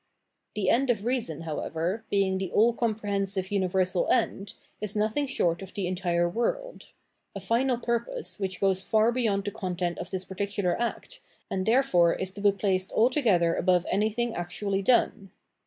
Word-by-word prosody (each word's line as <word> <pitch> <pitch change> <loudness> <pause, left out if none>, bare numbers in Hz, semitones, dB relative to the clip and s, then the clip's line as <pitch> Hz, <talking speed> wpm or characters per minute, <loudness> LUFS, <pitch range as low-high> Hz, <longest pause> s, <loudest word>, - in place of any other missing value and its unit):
The 195 -3 +1
end 260 +3 +2
of 220 -3 0
reason, 235 - -1
however, 165 +6 -3
being 195 -1 +1
the 190 -2 -3
all 230 +3 +4
comprehensive 200 -4 -2
universal 185 -2 +1
end, 195 0 0 0.3
is 210 -1 -3
nothing 220 +7 0
short 175 -9 0
of 190 - -10
the 200 - -2
entire 175 -1 0
world - - -3 0.2
— - - -48
a - - -3
final 245 +2 +1
purpose 235 - -3
which 190 -2 -3
goes 190 -1 +2
far 220 +3 +3
beyond 220 -5 0
the 205 - -3
content 180 -3 -3
of 175 - -6
this 190 -1 -4
particular 195 -1 -1
act, 370 - -4 0.3
and 185 +1 -2
therefore 220 -9 +4
is 190 0 -4
to 200 - -9
be 205 0 +5
placed 190 -1 -1
altogether 220 - +3
above 180 0 +2
anything 220 +3 0
actually 195 +3 -2
done. 200 -2 +2
200 Hz, 165 wpm, -27 LUFS, 185-230 Hz, 0.3 s, be